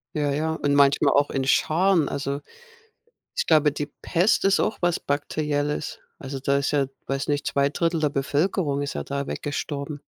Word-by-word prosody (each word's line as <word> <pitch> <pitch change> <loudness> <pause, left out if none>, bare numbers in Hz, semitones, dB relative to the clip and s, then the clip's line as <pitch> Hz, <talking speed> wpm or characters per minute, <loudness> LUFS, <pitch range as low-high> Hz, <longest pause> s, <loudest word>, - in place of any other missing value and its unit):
Ja, 145 -2 0
ja, 155 +3 0
und 145 -2 0
manchmal 140 0 +4
auch 145 0 +3
in 135 - -1
Scharen 165 +4 +3
also 140 0 -3 1.0
ich - - +1
glaube, 155 -2 +4
die 145 - -3 0.2
Pest 180 +6 +2
ist 195 0 +4
auch - - 0
was 175 -1 +1
Bakterielles. 145 +1 -2 0.2
Also, 135 0 -6
da 140 +1 +2
ist 140 - 0
ja, 140 -2 +1 0.2
weiß 135 0 -2
nicht, 145 0 0
2/3 160 +4 +1
der 150 - +2
Bevölkerung 145 +1 0
ist 140 - -3
ja - - -3
da 140 0 -3
weggestorben. 145 0 -4
145 Hz, 170 wpm, -24 LUFS, 140-155 Hz, 1.0 s, manchmal